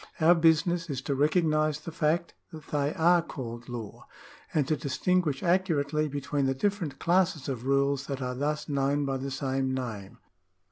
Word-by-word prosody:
Our 165 +2 +6
business 165 +1 +2
is 135 -3 -2
to 140 - -1
recognise 155 0 +2
the 165 - -7
fact 160 +2 0 0.2
that 155 -3 -11
they 145 -1 +1
are 175 +2 +4
called 120 -6 -7
law, 115 -4 -7 0.4
and 145 -4 +1
to 155 - +2
distinguish 150 +1 0
accurately 155 -5 +1
between 145 0 -1
the 135 - 0
different 175 -3 -1
classes 175 -3 +1
of 130 -2 -4
rules 140 0 +1
that 140 -2 -3
are 125 -1 -3
thus 150 +3 -2
known 140 0 0
by 135 -1 -1
the 135 +1 -4
same 135 -1 -1
name. 110 -7 -5
145 Hz, 170 wpm, -28 LUFS, 135-160 Hz, 0.4 s, Our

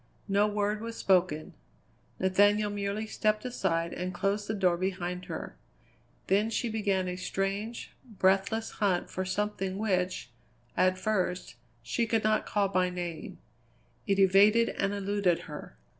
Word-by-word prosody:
No 200 +1 +3
word 210 0 -1
was 230 0 -5
spoken. 175 -5 +1 0.7
Nathaniel 205 +2 +3
merely 205 +1 -2
stepped 215 +1 0
aside 170 -9 -1
and 180 +1 -3
closed 200 +3 -1
the 220 - -1
door 185 -3 +3
behind 180 0 -3
her. - - -6 0.7
Then 205 +3 +2
she 230 +1 -1
began 200 -4 0
a 180 - -3
strange, 195 +5 -3 0.3
breathless 195 +4 +2
hunt 195 -4 0
for 185 - -3
something 195 -1 -2
which, 185 - -1 0.4
at 185 0 +3
first, 185 -2 -1 0.3
she 230 - -1
could 220 0 +1
not 215 0 +1
call 205 -1 +1
by 185 -1 +1
name; 175 -2 -5 0.7
it 195 - +2
evaded 200 +4 +5
and 195 0 -1
eluded 200 -3 0
her. - - -9
195 Hz, 140 wpm, -29 LUFS, 185-210 Hz, 0.7 s, evaded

